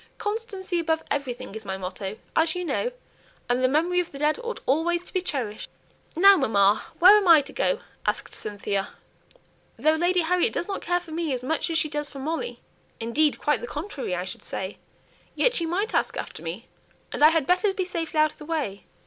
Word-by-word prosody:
'Constancy 415 -4 -3
above 320 -1 0
everything' 260 -7 -3
is 220 0 -7
my 190 -2 -4
motto, 190 +2 -5 0.2
as 320 +2 +2
you 360 0 -3
know, - - -1 0.6
and 245 +1 +1
the - - +6
memory 335 +6 +2
of 355 - -2
the 280 - -9
dead 300 +5 +1
ought 470 0 -4
always 340 +6 +1
to - - -11
be 370 - +1
cherished." 250 - -4 0.5
"Now, 395 +4 +8
mamma, 205 - +3
where 375 +4 +9
am 415 -3 +3
I 325 -3 +8
to 275 - -11
go?" - - 0 0.2
asked - - -2
Cynthia. 200 -1 -3 0.8
"Though 310 - +3
Lady 350 +3 +2
Harriet 350 +2 +2
doesn't 390 +3 -3
care 355 +1 0
for 340 -2 -13
me 320 -3 -1
as 250 -1 -3
much 320 +6 -1
as 330 - +1
she 320 -1 +3
does 295 -1 -3
for 280 - -11
Molly 320 - -3 0.4
indeed, 275 +7 +2
quite 295 - +1
the 485 - -5
contrary 280 - -4
I 180 +1 -3
should 185 - -7
say 190 +1 -5 0.6
yet - - +3
she 335 -8 -1
might 395 +6 -1
ask - - 0
after - - -6
me, - - -6 0.5
and - - -1
I 305 - +10
had 325 -3 +1
better 365 +5 +3
be 380 -1 -2
safely 330 -3 -3
out 310 0 +4
of - - -23
the 300 - -9
way." 290 -12 -3
320 Hz, 210 wpm, -25 LUFS, 260-360 Hz, 0.8 s, I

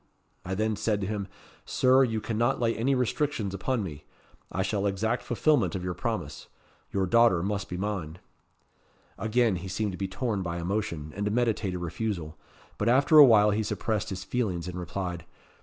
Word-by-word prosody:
I 95 +2 -3
then 110 +2 0
said 105 0 0
to - - -1
him: 100 -1 -3 0.4
'Sir, 130 +1 +4
you 115 -4 -1
cannot 120 +4 0
lay 115 -1 +1
any 135 +5 +1
restrictions 125 -4 -1
upon 110 +4 -1
me. 75 -5 -7 0.5
I 95 - -1
shall 100 +1 0
exact 110 +5 -1
fulfilment 145 0 +1
of 90 - -3
your 90 0 -2
promise. - - -4 0.4
Your 95 -1 +1
daughter 115 -4 +4
must 100 0 -2
be 90 - -4
mine.' 90 -5 -3 1.0
Again 115 -2 +2
he 90 +3 -7
seemed 100 +2 -2
to 90 - -8
be 95 - -1
torn 105 +1 -2
by 85 -2 -3
emotion, 85 -4 -3
and 100 - -3
to 105 - 0
meditate 110 -5 0
a - - -2
refusal; 85 -2 -4 0.4
but 105 - +2
after 140 +5 +6
a 145 - +12
while 105 -4 +6
he 105 +2 +1
suppressed 110 0 -2
his 95 -1 -5
feelings, 95 -8 -2
and 90 0 -5
replied. 90 -1 -4
105 Hz, 185 wpm, -28 LUFS, 90-115 Hz, 1.0 s, a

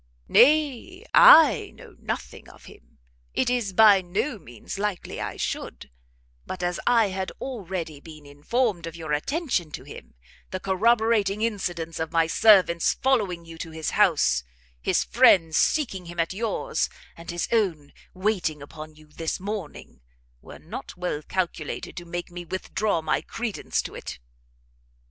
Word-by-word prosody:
"Nay, 310 - +3
I 320 - +8
know - - -15
nothing - - -6
of - - -17
him! - - -17 0.4
it 245 - +1
is 240 -5 -1
by 205 0 +6
no 210 +7 -3
means 120 - -9
likely 205 -3 -3
I - - -5
should: 60 +2 -5 0.5
but 185 -1 -6
as 175 0 -1
I 230 -4 +4
had 190 0 -4
already 185 - -5
been 155 -1 -13
informed 170 - -1
of 165 - -8
your 160 -3 -4
attention 245 - -1
to - - -6
him, - - -12 0.3
the 185 - -4
corroborating 215 +1 +2
incidents 175 -7 -3
of 160 0 -3
my 165 -1 +3
servant's 180 -1 +4
following 205 -10 0
you 165 0 -11
to 165 - -6
his 160 -1 -4
house, 165 - +3 0.4
his - - +1
friend's 160 - +4
seeking 195 - 0
him 175 0 -8
at 165 +2 0
yours, 230 - -2 0.3
and 170 0 -12
his 175 0 -2
own 180 -11 0 0.2
waiting 185 -6 -1
upon 155 +2 -10
you 155 0 -17
this 160 +2 -4
morning; 195 - -7 0.4
were - - -12
not - - -9
well 180 -4 -3
calculated 170 -2 -4
to 175 - -6
make 175 0 -6
me 175 0 -7
withdraw 185 0 -2
my 155 - 0
credence 230 -3 -3
to - - -8
it." - - -7
185 Hz, 150 wpm, -25 LUFS, 165-220 Hz, 0.5 s, I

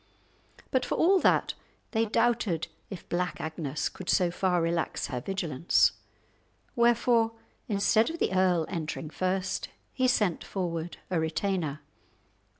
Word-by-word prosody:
But 260 -1 +2
for - - -2
all 380 +3 +4
that, - - +3 0.4
they 225 -1 +2
doubted 225 -6 +1 0.2
if 190 -4 -8
Black 180 +1 -2
Agnes 155 -2 -3
could 185 - -8
so 180 -2 +3
far 180 0 +1
relax 165 0 -1
her 125 -3 -3
vigilance; 170 -3 +2 0.8
wherefore 235 -1 +3 0.3
instead 215 +3 +3
of 330 - -5
the 190 - 0
earl 180 -3 +3
entering 160 -3 -4
first, 185 +2 -1 0.2
he 255 -1 +2
sent 210 -9 +1
forward 175 -3 -4
a 175 - +2
retainer. 160 -2 -1
185 Hz, 130 wpm, -28 LUFS, 165-225 Hz, 0.8 s, all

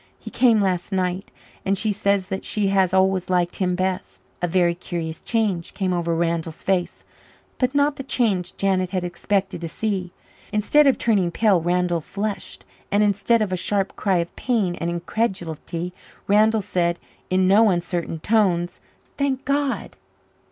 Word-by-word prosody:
He - - -10
came 230 -4 +4
last 185 -1 -1
night 185 0 -1 0.3
and 195 +1 +1
she 215 +2 0
says 200 -2 0
that 190 -1 -3
she 205 -2 0
has 190 -2 +3
always 190 -1 +2
liked 180 -1 +1
him 180 -2 0
best." 185 0 -3 0.2
A 175 - +1
very 175 0 +2
curious 170 -2 -5
change 210 -7 -1
came 185 -2 0
over 170 -1 0
Randall's 165 -1 -2
face 185 -2 -1 0.5
but 255 +1 +1
not 285 0 +2
the - - -4
change 205 -9 0
Janet 190 -2 +1
had 185 -2 -2
expected 190 +1 -1
to 165 - -4
see. 190 -1 -2 0.4
Instead 245 +8 +4
of 270 - +4
turning 200 -6 +2
pale 195 0 +3
Randall 175 0 +1
flushed; 205 +5 -5 0.3
and 205 +1 +3
instead 210 +3 +2
of 200 - -3
a - - +2
sharp 195 +2 -1
cry 195 -3 +1
of 170 0 -3
pain 220 -8 0
and 170 - 0
incredulity, 175 -2 -3 0.3
Randall 215 +2 +4
said 170 -2 0 0.3
in 185 0 +3
no 210 +3 +6
uncertain 175 -2 -2
tones, 185 -5 +1 0.4
"Thank 275 -1 0
God!" 280 0 -1
190 Hz, 160 wpm, -23 LUFS, 175-210 Hz, 0.5 s, no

